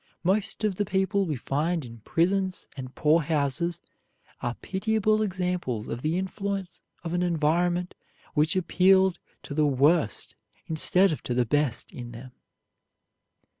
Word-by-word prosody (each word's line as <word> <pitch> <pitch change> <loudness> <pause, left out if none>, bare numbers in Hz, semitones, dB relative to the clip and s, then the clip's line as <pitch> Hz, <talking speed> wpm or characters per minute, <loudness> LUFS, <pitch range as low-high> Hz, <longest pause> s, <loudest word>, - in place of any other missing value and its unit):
Most 200 +4 0
of 205 -4 0
the 205 - +2
people 195 +1 +1
we 155 - -1
find 150 +5 -1
in 115 -1 -11
prisons 185 - 0
and 130 -1 -8
poor 155 +2 +4
houses 150 +2 0 0.6
are 120 0 -2
pitiable 215 +2 0
examples 180 - -2
of 120 - -4
the 155 +4 0
influence 195 -1 -4 0.2
of 170 -1 -4
an 175 - +1
environment 175 +1 +1 0.4
which 155 +2 +2
appealed 190 0 +4 0.2
to - - -7
the 150 0 +3
worst 140 - +2 0.3
instead 180 +4 +3
of 155 - -3
to 120 - -3
the 125 -1 +2
best 145 0 0
in 120 -1 -8
them. 125 +2 -10
170 Hz, 140 wpm, -27 LUFS, 145-190 Hz, 0.6 s, poor